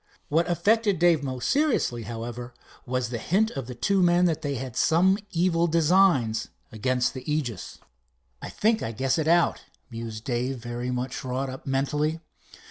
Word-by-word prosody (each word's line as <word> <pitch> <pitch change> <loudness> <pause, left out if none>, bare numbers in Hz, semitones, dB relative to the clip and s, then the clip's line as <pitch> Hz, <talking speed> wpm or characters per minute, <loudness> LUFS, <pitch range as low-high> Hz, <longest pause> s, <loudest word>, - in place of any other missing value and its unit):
What 165 +4 +1
affected 205 +4 +2
Dave 170 -2 +4
most 130 -3 -3
seriously, 275 - +1
however, 120 +2 -6 0.3
was 125 -1 -1
the 120 -2 -4
hint 210 - +1
of 135 -4 -6
the 125 - -7
two 195 +10 +1
men 175 0 +4
that 160 -2 0
they 145 -3 -2
had 130 -1 -6
some 185 +7 +3
evil 170 0 +1
designs 165 - +3 0.2
against 125 +3 0
the 130 +3 -5
Aegis. 130 -9 -3 0.6
"I - - -6
think 220 +1 +1
I 115 - -3
guess 130 +7 0
it 155 - -1
out," 170 +1 +3 0.3
mused 115 -1 -6
Dave, 125 +1 -2
very 120 +1 -5
much 125 +1 -3
wrought 130 +1 -3
up 130 - -10
mentally. 150 +4 0
135 Hz, 165 wpm, -26 LUFS, 125-175 Hz, 0.6 s, Dave